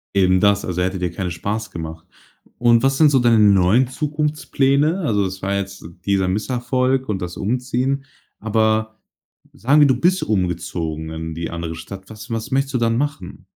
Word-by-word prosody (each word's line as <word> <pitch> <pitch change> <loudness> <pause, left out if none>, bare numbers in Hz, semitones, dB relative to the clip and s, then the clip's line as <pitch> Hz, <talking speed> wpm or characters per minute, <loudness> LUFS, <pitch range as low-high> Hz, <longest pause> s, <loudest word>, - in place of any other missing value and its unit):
Eben 95 -1 +4
das, 100 0 +3
also 90 0 -2
hätte 95 +1 -1
dir 90 -1 -2
keine 90 +1 -4
Spaß 105 +6 -4
gemacht. 80 -2 -7 0.5
Und 120 -1 +4
was 135 0 +2
sind 155 - +6
so 135 - +4
deine 120 -2 +4
neuen 100 +4 +4
Zukunftspläne? 150 +2 0
Also, 105 - +1
es 95 0 -5
war 100 +1 -1
jetzt 95 -2 -5 0.2
dieser 95 -2 +1
Misserfolg 130 +5 0
und 100 -3 -2
das 90 0 -5
Umziehen. 130 +4 -1 0.3
Aber 110 0 0 0.6
sagen 140 +6 +3
wir, 145 - +7
du 130 -3 +2
bist 180 +5 +2
umgezogen 85 -5 -2
in 80 0 -5
die 85 0 -4
andere 85 -1 -5
Stadt. 95 +4 -10
Was 110 +1 -10
was 115 +3 -3
möchtest 135 0 0
du - - +2
dann 115 0 +1
machen? 140 -10 -4
110 Hz, 175 wpm, -20 LUFS, 95-130 Hz, 0.6 s, wir